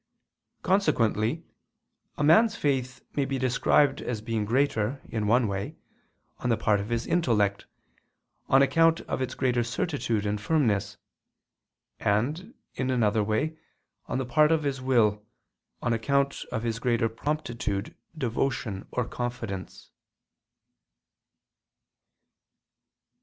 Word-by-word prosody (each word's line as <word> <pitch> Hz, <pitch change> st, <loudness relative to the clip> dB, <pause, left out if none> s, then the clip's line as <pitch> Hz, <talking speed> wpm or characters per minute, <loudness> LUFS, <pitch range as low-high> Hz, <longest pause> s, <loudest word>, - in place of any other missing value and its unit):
Consequently 150 Hz, -, +1 dB, 0.7 s
a -, -, -1 dB
man's 210 Hz, +9 st, +5 dB
faith 130 Hz, -3 st, -1 dB
may 145 Hz, -, +2 dB
be 135 Hz, 0 st, -2 dB
described 135 Hz, +2 st, +2 dB
as 120 Hz, -3 st, -3 dB
being 110 Hz, -1 st, -2 dB
greater, 130 Hz, 0 st, +1 dB
in 110 Hz, -2 st, -2 dB
one 120 Hz, +2 st, +3 dB
way, 100 Hz, 0 st, -4 dB, 0.6 s
on 125 Hz, -, -2 dB
the 115 Hz, -, +2 dB
part 105 Hz, -1 st, +2 dB
of 100 Hz, +2 st, -5 dB
his 115 Hz, 0 st, -1 dB
intellect, 105 Hz, -, +1 dB, 0.8 s
on 135 Hz, +1 st, +6 dB
account 165 Hz, +3 st, +3 dB
of -, -, -4 dB
its 130 Hz, -1 st, -3 dB
greater 125 Hz, -2 st, +1 dB
certitude 115 Hz, -, -2 dB
and 105 Hz, 0 st, -1 dB
firmness, 115 Hz, -6 st, +1 dB, 1.0 s
and, 150 Hz, -, -1 dB, 0.2 s
in 130 Hz, 0 st, -2 dB
another 110 Hz, -4 st, +2 dB
way, 125 Hz, +10 st, -1 dB, 0.5 s
on -, -, -2 dB
the 130 Hz, -, -2 dB
part 150 Hz, +5 st, +4 dB
of 160 Hz, -1 st, +2 dB
his 135 Hz, -2 st, -2 dB
will, 110 Hz, -5 st, +2 dB, 0.6 s
on 120 Hz, -, +1 dB
account 140 Hz, +4 st, 0 dB
of 115 Hz, -2 st, -2 dB
his 115 Hz, -1 st, -2 dB
greater 115 Hz, -2 st, +1 dB
promptitude, 115 Hz, -5 st, -3 dB, 0.2 s
devotion, 120 Hz, -6 st, -2 dB
or 125 Hz, -, -1 dB
confidence. 105 Hz, -, -5 dB
120 Hz, 120 wpm, -27 LUFS, 110-140 Hz, 1.0 s, on